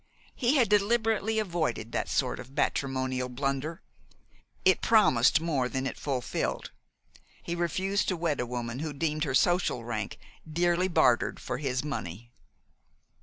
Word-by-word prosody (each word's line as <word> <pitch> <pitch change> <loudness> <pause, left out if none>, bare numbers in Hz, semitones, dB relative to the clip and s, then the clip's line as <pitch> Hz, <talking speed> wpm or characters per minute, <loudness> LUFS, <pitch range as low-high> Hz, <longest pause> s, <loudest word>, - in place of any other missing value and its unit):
He 250 +2 +1
had 250 -5 +4
deliberately 220 +1 +2
avoided 160 - -1
that - - -2
sort 130 -2 0
of 125 0 -9
matrimonial 130 -3 0
blunder. 140 +6 -3 0.8
It 185 -1 +5
promised 165 - +5
more 145 -6 0
than 130 0 -2
it - - -3
fulfilled. 130 -4 -3 0.7
He 170 - -3
refused 185 +4 0
to 185 - 0
wed 165 -4 -1
a 125 - -1
woman 120 0 -4
who 155 0 -3
deemed 155 +1 -1
her 135 -2 -1
social 175 -7 +2
rank 110 -4 -4 0.3
dearly 175 +3 +2
bartered 160 -9 +2
for - - -4
his 130 -3 -1
money. 120 - -5
150 Hz, 140 wpm, -29 LUFS, 125-180 Hz, 0.8 s, It